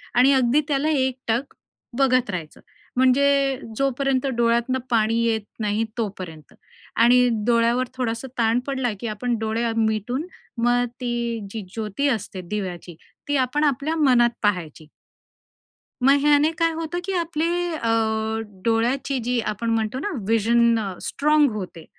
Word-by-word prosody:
आणि 255 +3 +6
अगदी 260 +1 +3
त्याला 290 +1 +1
एकटक 260 -3 -1 0.4
बघत 255 -3 +3
राहायचं. 170 -5 -6 0.4
म्हणजे 275 +1 +3 0.2
जोपर्यंत 275 0 0
डोळ्यांतनं 235 +2 +1
पाणी 225 -1 +2
येत 225 -1 +1 0.2
नाही 215 +1 0
तोपर्यंत 185 -8 -6 0.4
आणि 245 +2 +5 0.2
डोळ्यावर 235 +2 +2
थोडासा 245 0 -3
ताण 230 0 +2
पडला, 265 -3 -1
की 235 - -4
आपण 230 +3 -2
डोळे 225 +1 -1
मिटून 225 - 0 0.4
मग 245 0 +3 0.2
ती 235 -1 -2
जी 225 - -5
ज्योती 220 +5 -2
असते 205 -6 -3
दिव्याची, 180 -4 -5 0.3
ती 290 0 +1
आपण 265 +3 0
आपल्या 290 +2 0
मनात 250 -6 +4
पाहायची. 170 -6 -1 1.1
मग 275 +3 +5
ह्याने 295 +1 +4
काय 330 0 +3
होतं, 330 +2 -3
की 390 - -2
आपले 330 -2 -1 0.3
अ, 230 -7 -2 0.7
डोळ्याची 245 +4 0
जी 245 0 0
आपण 230 +3 -3
म्हणतो 225 +2 -1
ना 415 - -3 0.2
व्हिजन 230 +1 +3 0.2
स्ट्राँग 300 -2 +2
होते. 180 -5 -7
240 Hz, 130 wpm, -23 LUFS, 225-275 Hz, 1.1 s, आणि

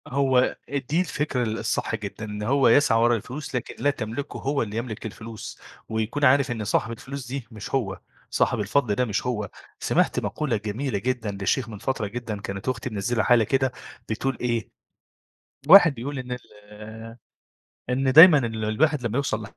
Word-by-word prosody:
هو 130 -1 +2
إ 140 - -1
دي 140 +5 -1
الفكرة 150 -6 -1
ال 110 -1 -2
الصح 110 0 -1
جدًا، 105 0 -6
إن 105 0 -6
هو 135 +5 +3
يسعى 135 -6 +5
ورا 120 +1 +4
الفلوس 130 +6 -6
لكن 125 - -4
لا 145 - +4
تملكه 130 +1 -4
هو 140 +1 -1
اللي 110 -1 -4
يملك 115 -2 -5
الفلوس، 110 0 -8 0.3
ويكون 110 +6 -1
عارف 135 0 +4
إن 115 -2 -3
صاحب 110 +2 0
الفلوس 130 +3 -7
دي 130 -2 -5
مش 110 +3 -5
هو، 100 -8 -2 0.3
صاحب 115 - +1
الفضل 105 +1 +1
ده 125 - +1
مش 105 0 -2
هو، 105 -5 -2 0.3
سمِعت - - +1
مقولة 145 -7 -2
جميلة 110 +4 -3
جدًا 115 -3 -2
لشيخ 120 +5 0
من 110 - -7
فترة 120 -1 -2
جدًا 110 -2 -5
كانت 100 +4 -4
أختي 125 -1 -3
منزّلة 110 +2 -1
حالة 120 -2 +5
كده، 130 +4 +1 0.4
بتقول 125 +3 -2
إيه، 120 -3 -1 1.0
واحد 175 -3 +8
بيقول 135 +3 -5
إن 125 -1 -7
ال 110 0 -10 0.7
إن 130 +1 +1
دايمًا 160 +3 +10
ال 115 -4 -2
الواحد 140 +6 +1
لمّا 115 +2 -1
يوصَل 110 -6 -1
120 Hz, 175 wpm, -25 LUFS, 110-135 Hz, 1.0 s, دايمًا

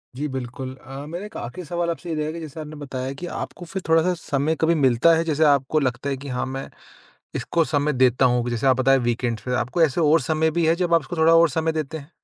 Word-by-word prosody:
जी 145 +4 -2
बिल्कुल 130 -1 -6
अ, 135 +2 -9
मेरा 175 +6 -6
एक 210 - -12
आख़िरी 170 +10 -7
सवाल 170 +2 -2
आपसे 170 +1 -5
ये 160 - -1
रहेगा 155 0 -2
कि 170 - -7
जैसे 160 -1 -8
आपने 155 0 -7
बताया 135 -2 -5
कि 145 +6 -7
आपको 175 - -6
फिर 190 +3 -5
थोड़ा-सा 165 +3 +4
समय 155 -2 -1
कभी 165 +1 +3
मिलता 135 +2 +4
है 165 - +1
जैसे 160 -1 +1
आपको 140 +1 +3
लगता 130 0 -2
है 135 - -2
कि 140 +2 -9
हाँ 125 -1 -2
मैं 135 +1 -6 0.7
इसको 170 -1 0
समय 150 -1 0
देता 130 -1 +3
हूँ, 125 -1 +1
जैसे 120 +2 -1
आप 130 -1 +5
बताए 135 +1 +4
वीकेंड्स 120 -2 -1
पे। 125 - -2
आपको 130 +7 0
ऐसे 160 0 +2
और 160 +1 +4
समय 160 +4 +1
भी 165 +1 0
है 165 - +4
जब 175 -1 +1
आप 165 - +5
इसको 170 +4 -7
थोड़ा 160 +1 +5
और 165 0 +6
समय 160 +3 0
देते 155 0 -3
हैं? 145 +1 -13
150 Hz, 255 wpm, -23 LUFS, 130-165 Hz, 0.7 s, और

